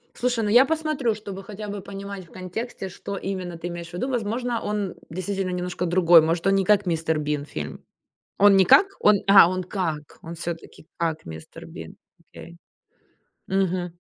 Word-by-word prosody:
Слушай, 245 -2 0
ну, 205 - 0
я 245 +5 +7
посмотрю, 305 -6 0
чтобы 200 -2 -8
хотя 210 +1 -8
бы 205 0 -5
понимать 200 -1 -8
в - - -22
контексте, 190 +3 -6
что 195 +2 -7
именно 185 -3 -4
ты 175 - -5
имеешь 170 -1 -7
в - - -15
виду. 185 +9 -2
Возможно, 240 0 -2
он 205 -3 -2
действительно 185 +2 -3
немножко 180 0 -3
другой. 175 -1 +6
Может, 165 +3 -1
он 195 - +4
не 195 -1 +2
как 205 +1 +3
"Мистер 160 -2 0
Бин" 150 -1 -2
фильм, 75 - -7 0.5
он 200 -1 +7
не 190 - +6
как, 385 - +7 0.4
а, 195 -3 +8
он 185 0 -2
как, 165 -6 -4
он 165 - -7
всё-таки 165 -1 -7
как 160 -2 -2
"Мистер 80 -1 -10
Бин". - - -10 0.2
Окей. 170 0 -13 0.9
Мгм. 180 -2 -1
185 Hz, 175 wpm, -24 LUFS, 170-205 Hz, 0.9 s, а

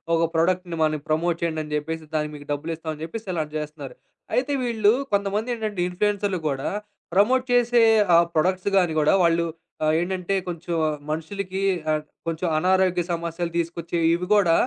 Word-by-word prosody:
ఒక 165 0 +3
ప్రొడక్ట్‌ని 175 +1 +1
మనకి 155 -2 0
ప్రమోట్ 165 +2 +1
చేయ్యండని 155 -2 -2
జెప్పేసి 160 +1 -3
దానికి 150 0 -1
మీకు 145 -1 -11
డబ్బులిస్తామని 155 +1 -4
జెప్పేసి 210 +7 -6
అలాంటివి 155 -2 -2
జేస్తున్నారు. 150 -2 -7 0.4
అయితే 260 +3 +1
వీళ్ళు 220 -4 +3 0.2
కొంతమందేంటంటే, 210 0 -1
ఇన్‌ఫ్లూయెన్సరులు 200 0 0
గూడా 135 -2 -1 0.4
ప్రమోట్ 250 +7 +4
చేసే 240 -1 +4 0.3
ఆ - - +8 0.2
ప్రొడక్ట్స్ 185 +4 +1
గానీ 175 -4 +3
గూడా, 150 - +4
వాళ్ళు 170 0 +2 0.4
ఆహ్, 155 0 +3
ఏంటంటే 180 +1 -2
కొంచెం 170 0 -4 0.4
మనుషులకి 190 +4 -4 0.3
ఆహ్, 155 0 0 0.2
కొంచెం 165 +2 -1
అనారోగ్య 185 +1 +2
సమస్యలు 170 0 -3
దీసుకొచ్చే 170 0 -3 0.2
ఇవి 180 +1 -4
గూడా 195 -5 +4
170 Hz, 145 wpm, -24 LUFS, 155-195 Hz, 0.4 s, ఆ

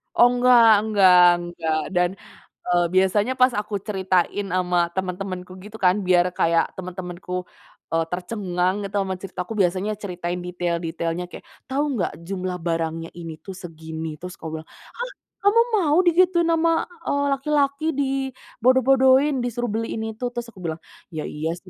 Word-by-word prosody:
Oh 245 - +7
enggak 245 -1 +5 0.2
enggak 195 -4 +5 0.3
enggak 165 -2 -2 0.2
dan, 180 0 +3 0.6
eee, 175 -1 +3
biasanya 200 +6 +3
pas 255 - +7
aku 210 0 -6
ceritain 190 0 0
sama 180 -1 +1 0.2
teman-temanku 185 0 -4
gitu 215 +1 -10
kan 180 +1 +5
biar 180 -1 +5
kayak 165 0 +3
teman-temanku, 180 0 -7 0.6
eee, 165 0 +2
tercengang 180 -1 -1
gitu 195 - -7
sama 190 -1 -2
cerita 190 -2 -9
aku 225 - -6
biasanya 190 +2 +1
ceritain 180 -2 -3
detail-detailnya 170 -1 -2
kayak, - - -10 0.2
"Tahu 280 +3 0
nggak - - -1
jumlah 185 -2 -3
barangnya 165 -1 -2
ini 165 -2 -6
tuh 190 +1 -8
segini?" 160 -2 -7
Terus 180 0 -8
aku 160 - -7
bilang, - - -22
"Hah, - - -8 0.3
kamu 425 +3 +5 0.2
mau 305 0 +2
digituin 345 0 +4
sama, 330 0 +3 0.4
eee, 285 0 +1
laki-laki? 280 +1 0
Dibodoh-bodohin 265 0 +2
disuruh 240 -1 -2
beli 225 +1 -1
ini 220 0 -4
itu?" 245 +3 -5
Terus 240 -1 -4
aku 185 - -13
bilang, 165 -1 -4 0.3
"Ya 155 -3 -5
iya 155 +2 -3
sih 185 +1 -16
190 Hz, 150 wpm, -23 LUFS, 175-245 Hz, 0.6 s, Oh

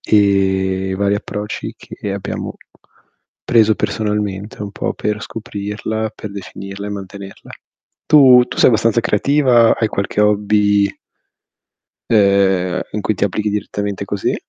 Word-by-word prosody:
e 95 -2 +2
i - - -1
vari 100 +1 +1
approcci 105 +1 -5
che 100 - -7
abbiamo 100 - -5 0.9
preso 110 -2 +4
personalmente 105 0 -3
un 100 - -5
po' - - -3
per 105 0 -2
scoprirla, 110 +1 -4
per 105 - -8
definirla 100 0 -8
e - - -5
mantenerla. 100 0 -9 0.6
Tu 130 -4 +7
tu - - -7
sei - - +6
abbastanza 115 0 +2
creativa? 120 +1 +3
Hai 110 -1 0
qualche 100 0 -2
hobby 105 -1 +2 1.2
ehm, 95 -4 +3
in 105 - -3
cui 110 - 0
ti - - -1
applichi 105 +1 -1
direttamente 100 -1 -3
così? 100 0 -1
105 Hz, 130 wpm, -17 LUFS, 100-110 Hz, 1.2 s, Tu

